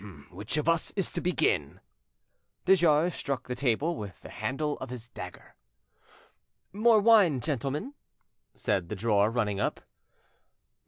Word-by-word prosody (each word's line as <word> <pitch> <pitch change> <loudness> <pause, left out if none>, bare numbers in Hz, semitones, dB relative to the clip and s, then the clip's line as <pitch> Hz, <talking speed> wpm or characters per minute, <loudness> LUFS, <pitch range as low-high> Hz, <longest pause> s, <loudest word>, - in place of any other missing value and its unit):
"Which 100 +10 -5
of 150 - -1
us 165 -1 +2
is 195 -3 -1
to - - -3
begin?" 380 - 0 0.9
De 190 - +7
Jars 170 -1 +3
struck 135 -2 -4
the 125 - -2
table 140 +6 0
with 100 - -8
the - - -10
handle 150 +2 -2
of 130 - -6
his 120 -2 -8
dagger. - - -10 1.2
"More 220 +2 +5
wine, 200 - +5
gentlemen?" 145 - -3 0.6
said 95 -4 -1
the - - -3
drawer, 105 0 +2
running 105 -4 -1
up. - - -1
140 Hz, 140 wpm, -29 LUFS, 115-175 Hz, 1.2 s, De